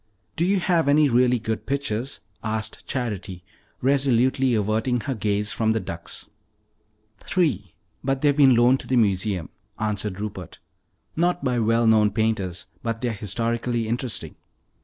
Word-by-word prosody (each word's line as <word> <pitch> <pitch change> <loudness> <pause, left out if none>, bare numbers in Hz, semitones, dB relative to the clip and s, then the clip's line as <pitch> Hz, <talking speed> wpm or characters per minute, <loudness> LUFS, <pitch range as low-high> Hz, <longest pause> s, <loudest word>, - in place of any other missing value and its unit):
"Do 170 - +1
you 195 0 +2
have 175 -4 +1
any 145 0 +5
really 125 0 +3
good 110 -1 -4
pictures?" 135 -5 -2 0.2
asked 110 -1 -4
Charity, 100 -8 -4 0.4
resolutely 130 -1 +3
averting 110 +4 0
her 135 - -2
gaze 105 -2 0
from 110 -1 +1
the 110 - 0
ducks. 85 -3 -7 0.9
"Three, 120 - -1 0.3
but 135 +1 -1
they've 145 -1 +4
been 135 -4 +6
loaned 120 +3 +4
to - - -8
the 130 - +1
museum," 100 -5 +1 0.3
answered 105 -3 -2
Rupert. 95 -4 -6 0.6
"Not 175 +1 +1
by 125 -3 +1
well 115 +1 +2
known 110 -2 +5
painters, 105 -6 -1 0.2
but 115 -1 -3
they're 120 -2 -1
historically 115 +2 -1
interesting. 115 - -3
115 Hz, 140 wpm, -24 LUFS, 105-130 Hz, 0.9 s, been